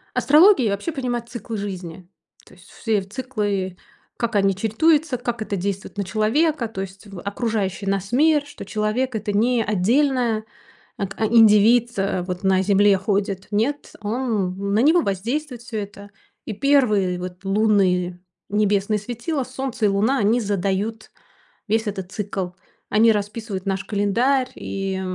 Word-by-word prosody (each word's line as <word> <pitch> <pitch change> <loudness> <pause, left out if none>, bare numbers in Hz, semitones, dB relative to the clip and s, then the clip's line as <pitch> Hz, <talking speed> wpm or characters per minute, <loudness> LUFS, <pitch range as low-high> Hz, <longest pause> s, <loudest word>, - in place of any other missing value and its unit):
Астрология 300 - +5
вообще 200 +12 -3
понимает 245 -4 -3
циклы 235 -2 -6
жизни. 185 -4 -6 0.4
То - - -17
есть 180 +1 -19
все 215 -3 -1
циклы, 205 -4 -3 0.4
как 235 -2 -2
они 195 -1 +3
чередуются, 285 - +2
как 240 -2 -3
это 205 -2 -3
действует 195 +2 -4
на 200 - 0
человека, 230 - +1
то 215 -3 -6
есть 195 +2 -8
в 195 -3 -9
окружающий 200 -1 -2
нас 195 +1 -2
мир, 295 +3 +4
что 290 - -10
человек- 220 +4 -1
это 210 -1 -2
не 230 +3 +2
отдельная 230 +3 +1 0.5
ат 195 -1 -3
а 220 - +1
индивид, 225 +2 +5
э, 195 -1 0
вот 180 +1 -5
на 190 -1 +3
Земле 200 0 +4
ходит. 195 0 -2
Нет, 240 +8 -1
он 205 -4 -2
на 210 - +3
него 315 +8 +5
воздействует 240 - -3
всё 235 -2 -5
это. 205 0 -8 0.4
И - - -4
первые 215 -8 +2
вот 180 +1 -8
лунные 195 -4 +2 0.3
небесные 210 0 +1
светила, 245 +7 -3
Солнце 255 -2 -3
и - - +6
Луна, 205 +7 +2
они 225 +3 +2
задают 200 +2 -2 0.6
весь 220 +1 +1
этот 190 -2 -5
цикл. 195 -3 -3 0.4
Они 225 +2 +5
расписывают 210 -1 -3
наш 195 0 -1
календарь. 240 +6 +1
И, 195 -1 -4
210 Hz, 150 wpm, -22 LUFS, 195-240 Hz, 0.6 s, и